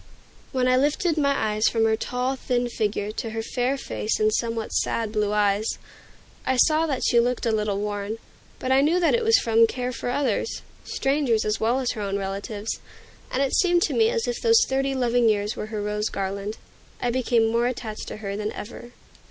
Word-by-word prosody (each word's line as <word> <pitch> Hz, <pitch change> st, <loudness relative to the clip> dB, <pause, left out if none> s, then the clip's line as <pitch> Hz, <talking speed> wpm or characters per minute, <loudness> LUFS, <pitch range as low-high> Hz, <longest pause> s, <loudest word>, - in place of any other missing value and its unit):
When 255 Hz, -2 st, +1 dB
I 255 Hz, 0 st, +4 dB
lifted 300 Hz, +5 st, +1 dB
my 280 Hz, -2 st, +2 dB, 0.2 s
eyes 215 Hz, +1 st, +2 dB
from 225 Hz, -1 st, +1 dB
her 220 Hz, 0 st, +3 dB
tall, 250 Hz, +3 st, -2 dB
thin 245 Hz, -1 st, -1 dB
figure 210 Hz, -2 st, -2 dB
to 225 Hz, +1 st, -4 dB
her 225 Hz, 0 st, -4 dB
fair 250 Hz, +4 st, -1 dB
face 220 Hz, -4 st, -2 dB
and 215 Hz, 0 st, +2 dB
somewhat 230 Hz, -1 st, -2 dB
sad 225 Hz, -2 st, 0 dB
blue 210 Hz, -1 st, 0 dB
eyes, 210 Hz, 0 st, +1 dB, 0.7 s
I 260 Hz, 0 st, 0 dB
saw 315 Hz, +5 st, +4 dB
that 275 Hz, -4 st, -2 dB
she 235 Hz, -, +4 dB
looked 245 Hz, +1 st, 0 dB
a 230 Hz, -, +2 dB
little 210 Hz, -2 st, 0 dB
worn; 205 Hz, +1 st, -3 dB, 0.4 s
but 260 Hz, -, -3 dB
I 265 Hz, +1 st, +5 dB
knew 325 Hz, +5 st, +3 dB
that 340 Hz, -, +3 dB
it 475 Hz, -1 st, +2 dB
was 450 Hz, 0 st, +5 dB
from 230 Hz, 0 st, +4 dB
care 250 Hz, +1 st, -3 dB
for 245 Hz, -, -4 dB
others, 255 Hz, -, -1 dB, 0.2 s
strangers 270 Hz, -5 st, 0 dB
as 215 Hz, 0 st, 0 dB
well 235 Hz, +4 st, +1 dB
as 255 Hz, -2 st, 0 dB
her 215 Hz, -, -5 dB
own 200 Hz, -1 st, -1 dB
relatives; 200 Hz, +2 st, -4 dB, 0.5 s
and 270 Hz, -, 0 dB
it 275 Hz, -, -1 dB
seemed 350 Hz, -2 st, +3 dB
to -, -, 0 dB
me 450 Hz, -1 st, +4 dB
as 465 Hz, -1 st, -1 dB
if 485 Hz, -1 st, -2 dB
those 455 Hz, -1 st, +5 dB
thirty 270 Hz, 0 st, 0 dB
loving 245 Hz, -2 st, +3 dB
years 210 Hz, 0 st, 0 dB
were 210 Hz, -, -5 dB
her 215 Hz, -1 st, -4 dB
rose 210 Hz, +1 st, -1 dB
garland. 200 Hz, +2 st, -4 dB, 0.4 s
I 245 Hz, -, 0 dB
became 240 Hz, -2 st, +2 dB
more 235 Hz, +1 st, +2 dB
attached 230 Hz, -3 st, -5 dB
to -, -, -6 dB
her 200 Hz, 0 st, -3 dB
than 210 Hz, +1 st, -3 dB
ever. 240 Hz, +2 st, -9 dB
235 Hz, 210 wpm, -24 LUFS, 215-265 Hz, 0.7 s, I